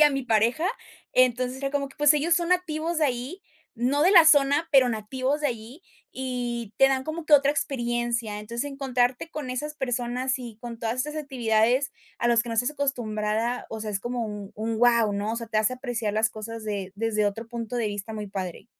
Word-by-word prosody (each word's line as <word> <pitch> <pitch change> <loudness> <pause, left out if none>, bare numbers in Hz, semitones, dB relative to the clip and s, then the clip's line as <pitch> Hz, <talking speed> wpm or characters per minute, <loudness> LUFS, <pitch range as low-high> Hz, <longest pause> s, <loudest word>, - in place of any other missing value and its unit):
y - - +9
a 300 - +8
mi 275 -1 -2
pareja. 235 +8 +2 0.5
Entonces, 255 0 +2
era 275 0 -2
como 280 -1 -1
que, - - -18
pues, 295 0 +6
ellos 315 +3 +2
son 345 0 0
nativos 335 -2 0
de 310 - +3
ahí, 260 +10 -4 0.3
no 255 +5 +1
de 355 - +5
la 340 -4 +9
zona, 290 +1 +4
pero 265 -3 +6
nativos 255 +6 -2
de - - +3
allí, 240 +7 -7 0.3
y 245 -4 -4
te 270 - +7
dan 265 -1 0
como 315 +1 -5
que 300 - +7
otra 280 0 +5
experiencia. 240 -5 -1
Entonces, 235 +5 -4
encontrarte 260 +1 0
con 295 -4 -5
esas 300 +4 -4
personas 250 0 -1
y 235 -4 -8
con 235 -1 -8
todas 230 +1 -2
estas 300 +4 -2
actividades 250 -2 +1 0.3
a 240 - +1
los 235 -1 +4
que 240 - -9
no 230 - -2
estás 245 +4 +1
acostumbrada, 235 -4 -1
o 220 -1 -5
sea, 215 - -4
es 200 -1 -2
como 240 0 -3
un 205 -2 -7
un 220 +1 -2
¡guau!, 235 -3 +4
¿no?, 205 +2 -2
o 230 - -3
sea, 230 - -5
te 215 - +1
hace 215 +4 +2
apreciar 240 -5 -3
las 220 +1 +2
cosas 220 +1 -7
de 200 -3 -4
desde 215 -1 +1
otro 220 +3 -3
punto 235 0 -5
de 230 -3 0
vista, 205 +2 -5
muy 210 -1 -5
padre. 185 -3 -5
245 Hz, 215 wpm, -26 LUFS, 225-275 Hz, 0.5 s, y